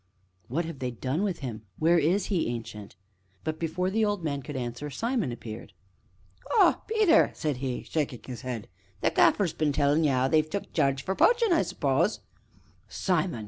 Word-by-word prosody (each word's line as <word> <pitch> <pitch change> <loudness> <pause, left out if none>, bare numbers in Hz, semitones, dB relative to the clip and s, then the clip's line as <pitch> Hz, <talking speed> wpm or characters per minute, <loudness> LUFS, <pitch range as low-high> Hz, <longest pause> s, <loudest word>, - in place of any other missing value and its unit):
"What 160 +7 -1
have 160 -4 -7
they 125 - -2
done 130 - -2
with 195 -6 -2
him? 120 -5 -5 0.2
Where 170 +2 +4
is 175 +6 +2
he, 175 - +1
Ancient?" 110 -4 -6 0.5
But, 155 0 -3
before 180 +3 -1
the 220 +2 +1
old 205 -4 0
man 140 -3 -2
could 145 +2 -8
answer, 125 +3 -4
Simon 225 - -1
appeared. 115 -2 -8 0.8
"Ah, - - +5
Peter!" 430 -7 +4
said 150 -5 -2
he, 130 -1 -3
shaking 145 -6 -2
his 125 -3 -7
head, 120 -4 -5 0.3
"the - - +2
Gaffer's 185 -6 +3
been 155 -2 +1
tellin' 145 +2 +2
ye 150 - +3
'ow 130 -1 +2
they've 155 +1 +2
took 200 +3 -5
Jarge 135 -3 +1
for 190 - -1
poachin', 460 - +4
I 325 - +4
suppose - - 0 0.4
" - - -34
"Simon!" 175 - -1
155 Hz, 185 wpm, -28 LUFS, 130-185 Hz, 0.8 s, Ah